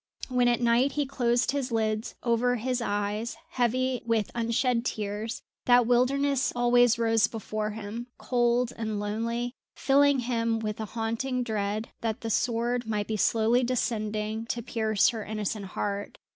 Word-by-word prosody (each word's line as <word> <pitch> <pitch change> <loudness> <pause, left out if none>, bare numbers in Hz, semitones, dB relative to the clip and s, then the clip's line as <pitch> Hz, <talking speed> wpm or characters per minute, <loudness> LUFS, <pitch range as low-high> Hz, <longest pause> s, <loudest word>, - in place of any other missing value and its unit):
When 250 -1 +3
at 240 0 +2
night 240 +3 +3
he 295 -1 0
closed 245 -2 +1
his 275 -3 -2
lids 220 0 -1
over 245 +1 +2
his 250 +1 -1
eyes 205 +2 -2
heavy 255 -1 0
with 225 -3 0
unshed 235 +1 +1
tears, 215 0 -3 0.2
that 245 -1 +6
wilderness 265 +3 +2
always 245 -1 +4
rose 225 -2 +3
before 215 -1 -3
him, 220 +2 -6
cold 240 0 +1
and 220 -2 -3
lonely, 230 +4 -2 0.2
filling 280 0 +4
him 230 -2 0
with 215 -1 -4
a 220 - -2
haunting 230 +4 -2
dread 215 -1 -2
that 225 -2 -2
the 225 - -3
sword 240 +1 0
might 210 -2 -1
be 220 - -1
slowly 225 +4 +3
descending 220 -2 -1
to 235 0 -3
pierce 220 -3 +2
her 225 -3 -4
innocent 210 -1 -3
heart. 200 +1 -4
230 Hz, 150 wpm, -28 LUFS, 215-245 Hz, 0.2 s, that